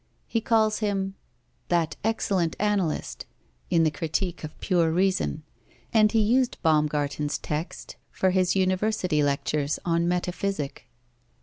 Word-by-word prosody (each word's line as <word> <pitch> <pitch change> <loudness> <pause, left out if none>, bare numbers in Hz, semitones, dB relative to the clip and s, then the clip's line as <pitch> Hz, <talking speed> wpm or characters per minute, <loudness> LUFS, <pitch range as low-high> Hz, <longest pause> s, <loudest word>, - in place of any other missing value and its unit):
He 230 - -1
calls 220 -1 +2
him 195 -3 -1 0.5
"that 165 -3 +1
excellent 195 -6 0
analyst" 200 -6 -1 0.4
in 165 -2 +3
the 155 - +3
Critique 165 +4 -3
of 155 - -8
Pure 170 -4 +2
Reason, 180 - +1 0.5
and 215 -2 +5
he 225 - +3
used 245 +4 +2
Baumgarten's 150 -2 +1
text 155 +4 -5
for 190 - +1
his 185 0 +2
University 185 -3 +1
lectures 145 +1 0
on 170 0 +1
Metaphysic. 180 -3 -2
180 Hz, 120 wpm, -26 LUFS, 155-205 Hz, 0.5 s, and